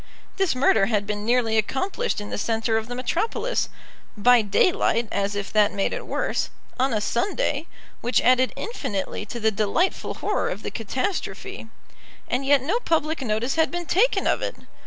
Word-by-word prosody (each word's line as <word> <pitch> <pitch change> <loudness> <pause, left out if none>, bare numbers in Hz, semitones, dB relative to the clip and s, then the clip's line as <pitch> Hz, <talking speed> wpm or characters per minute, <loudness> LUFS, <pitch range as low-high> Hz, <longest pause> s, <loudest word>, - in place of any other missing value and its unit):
This 385 -8 +1
murder 225 -6 +4
had 210 -3 +1
been 210 +1 -3
nearly 230 -2 +3
accomplished 375 - -1
in 205 - -7
the - - -2
centre 225 +1 0
of 220 0 -1
the 245 - -5
metropolis, 440 - -1 0.5
by 245 +3 +6
daylight, 230 - +2
as 200 +1 -1
if 200 -1 -4
that 210 -1 +4
made 195 - 0
it - - -5
worse, - - -1 0.3
on 260 +1 +2
a 215 - +1
Sunday, 295 - -1 0.3
which 240 0 +2
added 255 +1 +4
infinitely 210 - -4
to 235 - -5
the 220 0 +2
delightful 215 - 0
horror 420 - -1
of 200 - -5
the - - -4
catastrophe; 255 - -3 0.6
and 255 +2 0
yet 280 -2 +5
no 370 - +1
public 320 - 0
notice 235 +1 0
had 320 - +3
been 350 0 -4
taken 415 +10 +2
of - - +2
it! - - -3
245 Hz, 175 wpm, -24 LUFS, 215-320 Hz, 0.6 s, by